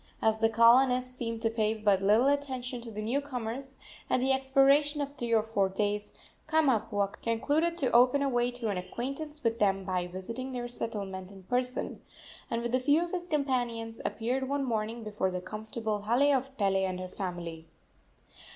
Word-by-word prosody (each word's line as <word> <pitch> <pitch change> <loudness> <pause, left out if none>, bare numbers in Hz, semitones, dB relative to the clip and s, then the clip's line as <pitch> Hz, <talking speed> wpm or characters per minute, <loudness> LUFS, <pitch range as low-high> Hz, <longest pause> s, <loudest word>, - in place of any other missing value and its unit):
As 220 0 +2
the 225 0 +3
colonists 250 +3 +5
seemed 230 -1 -3
to 225 - +2
pay 220 -1 +1
but 205 -3 +2
little 210 +5 +4
attention 260 -3 -1
to 235 - -8
the 215 -1 -5
new 250 +6 0
comers, 265 0 -5 0.3
at - - +3
the 265 +2 +2
expiration 275 +3 +3
of 280 -1 -3
three 240 -3 -3
or 220 -2 +4
four 205 -3 0
days 205 +1 -1 0.4
Kamapuaa 230 -10 +1
concluded 295 +9 0
to 270 -7 +1
open 250 +4 +5
a - - +1
way 245 -2 +1
to 245 -2 -3
an 195 -3 -1
acquaintance 275 +10 -5
with 230 0 0
them 195 -2 +2
by 180 -2 -1
visiting 230 +9 -6
their 240 -1 -3
settlement 200 -6 -4
in 195 -1 -13
person, 250 +5 -2 0.5
and 230 0 -2
with 240 0 -3
a 255 - +4
few 290 +6 +3
of 345 - -9
his 355 -1 -3
companions 245 -7 -1
appeared 255 +4 -2
one 280 0 0
morning 225 -1 -2
before 210 -3 -1
the 180 0 -3
comfortable 215 +2 -4
hale 255 +7 +3
of 270 +1 -3
Pele 195 -2 +2
and 185 -1 -2
her 185 - -5
family. 175 -4 -6
235 Hz, 185 wpm, -30 LUFS, 210-265 Hz, 0.5 s, colonists